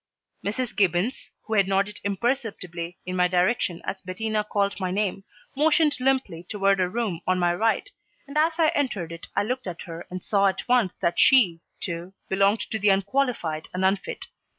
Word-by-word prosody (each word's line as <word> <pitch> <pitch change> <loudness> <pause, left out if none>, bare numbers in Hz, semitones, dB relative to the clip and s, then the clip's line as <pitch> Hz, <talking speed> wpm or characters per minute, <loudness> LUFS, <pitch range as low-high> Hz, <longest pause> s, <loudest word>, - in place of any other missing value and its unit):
Mrs. 220 +4 -2
Gibbons, 195 +5 +1 0.2
who 220 - -4
had 200 -3 +4
nodded 200 +2 0
imperceptibly 195 -6 -2
in 185 0 -3
my 180 0 +4
direction 180 -1 +1
as 190 - -4
Bettina 215 +3 -2
called 200 -1 -1
my 185 -1 -1
name, 195 0 -1 0.3
motioned 300 +1 +3
limply 255 -10 0
toward 195 -2 +2
a 180 -1 +2
room 210 -5 -2
on 185 0 +3
my 175 -1 +2
right, 225 - +1 0.4
and 280 - -10
as 315 +2 +3
I 320 -2 +4
entered 250 - -1
it 170 0 -9
I - - +2
looked 255 +1 -3
at 180 -1 -5
her 165 -1 -8
and 185 0 -7
saw 200 -1 +3
at 190 - -2
once 245 -7 +3
that 170 - +1
she, 200 -11 +5 0.2
too, 170 +2 -5 0.2
belonged 200 +3 +3
to 220 - -1
the 205 0 +3
unqualified 195 - 0
and 185 +1 +1
unfit. 195 +1 -1
200 Hz, 180 wpm, -25 LUFS, 180-235 Hz, 0.4 s, she